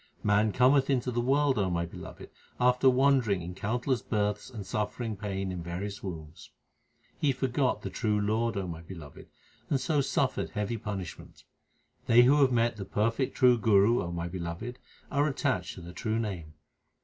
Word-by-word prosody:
Man 105 +1 +3
cometh 130 +4 +4
into 125 -2 +1
the 120 0 0
world, 135 0 +2
O 95 -2 +1
my 85 -1 -1
Beloved, 85 - -10 0.3
after 125 +1 +4
wandering 130 -8 +3
in 90 +2 -6
countless 120 +6 -1
births 105 0 -1
and 110 -6 -8
suffering 110 +2 -3
pain 95 -2 -3
in 90 -1 -5
various 95 +4 -5
wombs. 80 -4 -8 0.7
He 145 - +3
forgot 130 0 0
the - - -4
true 105 -3 0
Lord, 110 +2 0
O 95 - -2
my 85 -1 -6
Beloved, 80 -4 -11 0.4
and 140 - +2
so 145 +2 +1
suffered 135 -1 0
heavy 105 +2 -2
punishment. 100 -6 -7 0.6
They 120 +2 +7
who 145 +4 +5
have 135 -2 +5
met 120 -1 +1
the 100 - -5
perfect 115 +7 0
true 125 -3 +5
Guru, 110 +2 +4
O 85 - -4
my 85 0 -3
Beloved, 90 +8 -5 0.3
are 145 +1 +2
attached 140 - -1
to - - -10
the 85 +1 -10
true 110 +1 -2
Name. 90 -9 -4
110 Hz, 175 wpm, -29 LUFS, 95-125 Hz, 0.7 s, They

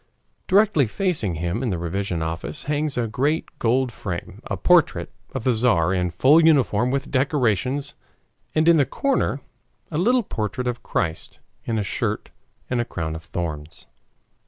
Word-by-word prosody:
Directly 195 - +4
facing 140 - -1
him 85 +7 -2
in 130 - -1
the 90 - -1
revision 85 0 -2
office 80 - -4
hangs 150 -1 -1
in 120 - +2
a - - -2
great 145 +7 -1
gold 125 +2 +2
frame 90 -6 -6
a - - -3
portrait - - +3 0.2
of 130 - -4
the 130 - +3
Tzar 110 -7 +2
in 90 -1 0
full 135 - +5
uniform 130 -7 +3
with 140 +1 -2
decorations, 135 - +1 0.6
and 155 +1 +3
in 170 -1 +7
the 140 - +4
corner 275 -1 0 0.5
a 155 - -1
little 245 +6 +3
portrait 115 - -3
of 120 -1 -2
Christ 80 -4 -3 0.3
in 115 -2 -1
a 105 - 0
shirt - - -2 0.4
and 125 -1 0
a - - -2
crown 80 -6 -4
of 80 - -8
thorns. 80 -3 -5
125 Hz, 165 wpm, -23 LUFS, 90-145 Hz, 0.6 s, in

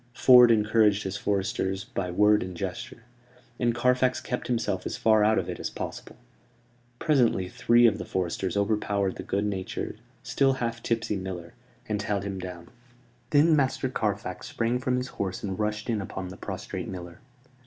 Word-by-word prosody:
Ford 125 -2 +8
encouraged 105 -2 +3
his 95 0 -4
foresters 95 -1 -1
by 95 -2 -4
word 105 +4 +4
and 90 -1 -6
gesture; 95 +5 -6 0.6
and 120 -2 +1
Carfax 125 +1 +2
kept 125 - -4
himself 105 -6 -1
as - - -4
far 110 -1 +4
out 110 +1 +3
of 90 - -1
it 90 - -5
as - - -3
possible. - - -7 0.8
Presently 120 - +2
three 120 +3 +4
of 105 -3 +3
the - - -3
foresters 95 +2 -2
overpowered 100 -2 0
the - - -5
good 100 +2 -1
natured, 95 -3 -4 0.2
still 135 -1 +2
half 120 -3 -3
tipsy 115 -3 -1
miller, 90 -3 -6 0.3
and 105 -1 -1
held 100 -1 -1
him 100 -1 -4
down. 90 -2 -8 0.6
Then 155 +2 +5
Master 135 -2 +1
Carfax 105 -6 -3
sprang 120 +2 -1
from 130 0 0
his 125 +1 -2
horse 95 -7 -4
and 95 -1 -4
rushed 105 0 -2
in 110 -4 0
upon 95 0 -6
the 95 - -9
prostrate - - -6
miller. 90 -2 -8
105 Hz, 170 wpm, -27 LUFS, 95-120 Hz, 0.8 s, Ford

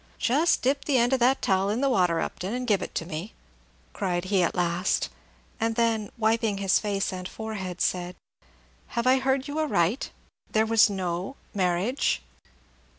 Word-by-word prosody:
"Just 295 +8 +2
dip 275 +2 +1
the 280 -3 +2
end 240 +2 +3
of 265 - +2
that 255 +3 +3
towel 190 0 +2
in 215 +3 0
the 280 - +3
water, 180 -10 +2
Upton, 195 +6 -3
and 250 0 -3
give 205 -5 +2
it - - -6
to 165 - -2
me," 170 +4 -6 0.6
cried 180 -3 -2
he 190 - +4
at 175 - 0
last; 175 +1 0 0.5
and 225 0 0
then, 225 -3 +1
wiping 220 -2 +1
his 195 -1 +3
face 200 -2 -1
and 185 0 -5
forehead, 195 -5 -5
said, 180 0 -1 0.8
"Have 235 - +1
I 260 +1 +5
heard 265 +1 0
you 290 +2 -3
aright, 230 - +1 0.4
there 220 0 +3
was 225 -1 +5
no 185 +3 -3 0.2
marriage?" 185 - 0
210 Hz, 170 wpm, -26 LUFS, 185-245 Hz, 0.8 s, I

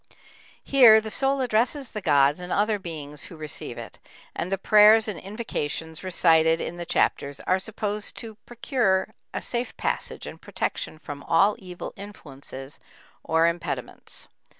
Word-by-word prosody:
Here 240 -5 +7
the 220 0 -5
soul 270 +2 +2
addresses 245 +3 0
the 215 - -6
gods 145 -2 +3
and 180 0 -7
other 210 0 +1
beings 150 -5 -6
who 170 - -11
receive 155 -1 -6
it, - - -9 0.4
and 180 - -3
the 195 - +1
prayers 215 +2 +6
and 210 -5 -4
invocations 165 -7 -4
recited 165 -3 +3
in 175 - -5
the 175 -1 -6
chapters 140 -2 0
are 185 - +1
supposed 210 0 -3
to 225 -1 -7
procure 230 -5 0 0.2
a - - -4
safe 240 0 -3
passage - - -2
and - - -9
protection - - -4
from 145 -2 -8
all 195 +7 +3
evil 180 -3 -8
influences 140 -8 -9 0.4
or 160 +1 +2
impediments. 170 -6 -4
185 Hz, 150 wpm, -25 LUFS, 160-220 Hz, 0.4 s, Here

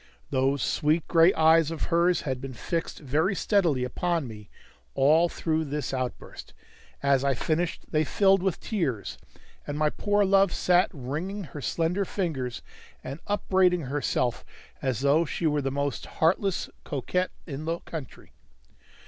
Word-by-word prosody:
Those 135 0 +1
sweet 155 +1 +1
gray 165 +1 +6
eyes 160 0 +5
of 165 -1 -4
hers 175 +1 +3
had 130 -4 -3
been 135 -2 -7
fixed 165 +6 -3
very 155 +8 +1
steadily 175 - +2
upon 165 +4 -1
me 105 -3 -11 0.5
all 160 +5 +4
through 160 -1 -1
this 145 0 -3
outburst; 130 -1 -5 0.5
as 140 -1 +3
I 140 -1 +2
finished 165 +7 -1
they 155 -1 +2
filled 195 +4 +3
with 190 -2 -1
tears, 150 - -3 0.5
and 145 - -3
my 150 0 +2
poor 205 0 +1
love 195 -1 +4
sat 180 +1 +3
wringing 165 +8 -4
her 150 -3 -8
slender 170 +7 0
fingers, 150 - -3 0.4
and 135 +4 -6
upbraiding 185 -3 +2
herself 130 -3 -1 0.4
as 130 -4 -1
though 140 +4 +4
she 170 +1 -3
were 150 -2 +2
the 135 - -1
most 140 +1 -3
heartless 185 +3 +1 0.2
coquette 175 +6 -1 0.2
in 150 -1 -6
the 165 +1 -1
country. 155 -7 -9
155 Hz, 150 wpm, -27 LUFS, 135-175 Hz, 0.5 s, gray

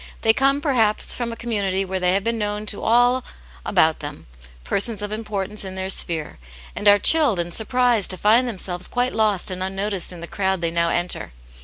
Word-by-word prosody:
They 225 - +5
come, 275 +3 +1
perhaps, 230 -8 +1
from 240 -1 -3
a - - -6
community 200 -5 -1
where 190 0 -3
they 180 0 +1
have 195 - 0
been 230 +1 -1
known 210 0 -3
to 210 - -1
all 245 +2 +3 0.4
about 160 0 +2
them, 145 0 -8 0.4
persons 205 - -1
of 205 - -5
importance 210 -1 -4
in 190 -1 -6
their 190 0 -3
sphere, 160 - -3 0.4
and 205 - -2
are 205 0 +8
chilled 290 - +4
and 170 0 -2
surprised 240 -1 +2
to 185 - +1
find 230 +6 +3
themselves 185 -5 -2
quite 245 +1 -1
lost 210 -4 0
and 185 0 -4
unnoticed 195 0 -1
in 175 - -10
the 170 - -7
crowd 190 0 -2
they 165 -1 -1
now 170 0 +1
enter. 175 - -2
205 Hz, 200 wpm, -21 LUFS, 185-230 Hz, 0.4 s, are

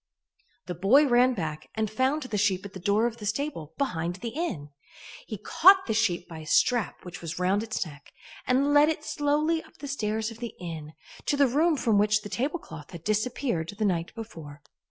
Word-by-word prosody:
The 180 - -4
boy 205 - +5
ran 250 0 +4
back 155 -5 -4
and 220 0 0
found 260 +8 0
the 240 -5 -3
sheep 195 -2 +1
at 200 - -9
the 190 - -7
door 205 +4 +2
of 235 -1 -2
the 210 - -8
stable, 215 - -3
behind 175 -10 -1
the 215 +5 -5
inn. 220 - -4 0.6
He 215 - -5
caught 380 - +5
the 220 - -1
sheep 180 -5 +1
by 165 -2 -9
a 155 - -9
strap 240 +4 +2
which 180 -1 -8
was 165 -1 -5
round 185 +3 +1
its 220 -3 -2
neck, 145 -3 -13 0.4
and 275 +3 +3
led 295 +1 +6
it 310 -1 -2
slowly 305 +2 +1
up - - -20
the 285 - -7
stairs 220 -4 -2
of 225 - -11
the 235 -1 -6
inn, 160 -3 -7 0.3
to 285 - +2
the 280 - +5
room 305 +5 +2
from 225 -5 +2
which 210 +1 +3
the 205 - -7
tablecloth 260 - -4
had 170 -3 -10
disappeared 215 - -1
the 215 - 0
night 170 -4 0
before. 160 -10 -9
215 Hz, 205 wpm, -27 LUFS, 175-270 Hz, 0.6 s, led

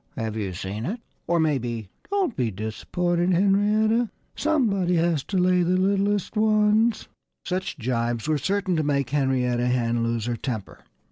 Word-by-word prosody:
Have 110 -3 -3
you 100 -4 -3
seen 100 +6 -4
it?" 225 +7 -3 0.3
Or 170 0 +2
maybe, 120 -8 -1 0.2
"Don't 390 - 0
be 125 -4 0
disappointed, 175 - -1
Henrietta! 210 +5 +3 0.3
Somebody 210 - +1
has 165 -4 +1
to 195 - -2
lay 180 0 +3
the 180 +1 +2
littlest 200 +2 +1
ones!" 215 +1 +3 0.4
Such 185 -2 -3
jibes 120 -1 -1
were 155 -1 +1
certain 195 +3 0
to 155 - +1
make 140 -3 0
Henrietta 125 -4 +1
Hen 120 -1 +1
lose 115 -1 -1
her 120 0 -1
temper. 110 -7 -5
170 Hz, 150 wpm, -24 LUFS, 120-200 Hz, 0.4 s, Henrietta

